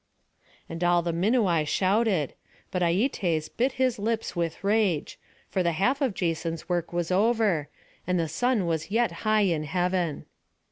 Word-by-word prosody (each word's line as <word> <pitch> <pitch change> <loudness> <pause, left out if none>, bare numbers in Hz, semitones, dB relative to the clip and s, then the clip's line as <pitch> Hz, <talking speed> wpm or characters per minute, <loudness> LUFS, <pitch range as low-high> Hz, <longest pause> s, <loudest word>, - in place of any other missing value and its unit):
And 165 +1 -5
all 175 0 +3
the 170 0 -1
Minuai 185 -3 +2
shouted; 190 - +1 0.4
but 180 - -1
Aietes 175 - +1
bit 255 +3 +1
his 255 -4 0
lips 225 +1 -2
with 170 0 -3
rage; 200 -6 +1 0.3
for 190 - -1
the 170 -1 +1
half 250 - +1
of 255 -8 0
Jason's 165 -1 -2
work 175 -2 -1
was 175 0 -2
over, 200 -6 +2 0.4
and 180 -1 +1
the 165 - 0
sun 225 - 0
was 160 0 -2
yet 230 -1 +1 0.2
high 215 0 +4
in 165 -6 +1
heaven. 175 0 -1
180 Hz, 155 wpm, -26 LUFS, 165-220 Hz, 0.4 s, high